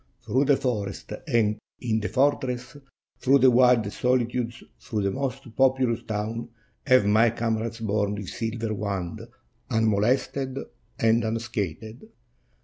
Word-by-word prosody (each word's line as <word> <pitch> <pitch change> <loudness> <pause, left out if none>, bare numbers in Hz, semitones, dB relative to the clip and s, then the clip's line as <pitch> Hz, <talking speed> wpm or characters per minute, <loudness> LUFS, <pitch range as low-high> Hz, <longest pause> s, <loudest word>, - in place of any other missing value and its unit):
"Through 135 +3 +2
the 140 -1 +4
forest 105 -5 -3
and 110 -5 +2 0.2
in 110 -3 0
the 105 - -3
fortress, 130 -2 0 0.4
through 135 +2 +5
the 130 -1 +6
wildest 120 -4 +3
soHtudes, 120 -1 0 0.2
through 105 -3 -3
the 100 - +1
most 135 -1 -4
populous 130 -3 +2
towns, 110 +2 -4 0.4
have 130 -5 +5
my 110 +3 +5
comrades 115 0 -2
borne 105 -1 0
this 100 -3 -6
silver 115 -1 -3
wand 100 -4 -3 0.5
unmolested 120 +5 +1 0.4
and 115 +1 +3
unscathed. 110 -2 -4
115 Hz, 125 wpm, -26 LUFS, 110-125 Hz, 0.5 s, the